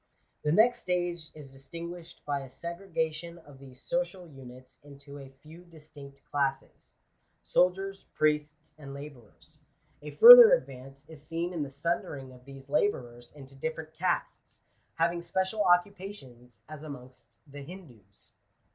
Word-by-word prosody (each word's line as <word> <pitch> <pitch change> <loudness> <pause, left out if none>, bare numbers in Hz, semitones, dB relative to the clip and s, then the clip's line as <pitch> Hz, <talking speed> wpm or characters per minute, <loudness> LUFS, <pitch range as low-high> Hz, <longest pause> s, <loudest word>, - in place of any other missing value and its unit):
The 150 - 0
next 230 +8 +4
stage 175 -3 -3
is 145 -3 -11
distinguished 170 +5 -10
by 145 -1 -1
a 135 -1 -10
segregation 170 +1 -5
of 145 -5 -16
these 130 -2 -14
social 205 - -3
units 130 -3 -14
into 140 0 -13
a 135 -1 -11
few 160 +3 -14
distinct 145 -5 -15
classes 135 -1 -3 0.2
— - - -45
soldiers, 195 +2 +1
priests, 150 0 -1
and 140 -2 -9
labourers. 140 -6 -13 0.4
A 150 - -8
further 485 - +11
advance 135 - -4
is 160 -2 -12
seen 170 +3 -4
in 165 - -3
the 145 - -4
sundering 140 -2 -4
of 125 0 -18
these 135 0 -13
labourers 120 -8 -2
into 135 -2 -14
different 160 +2 -6
castes, 175 +4 -3 0.3
having 170 +1 0
special 190 +4 -2
occupations, 175 - -2
as 155 -1 -10
amongst 130 -4 -12
the 145 -1 -11
Hindoos. 125 - -14
150 Hz, 140 wpm, -29 LUFS, 135-175 Hz, 0.4 s, further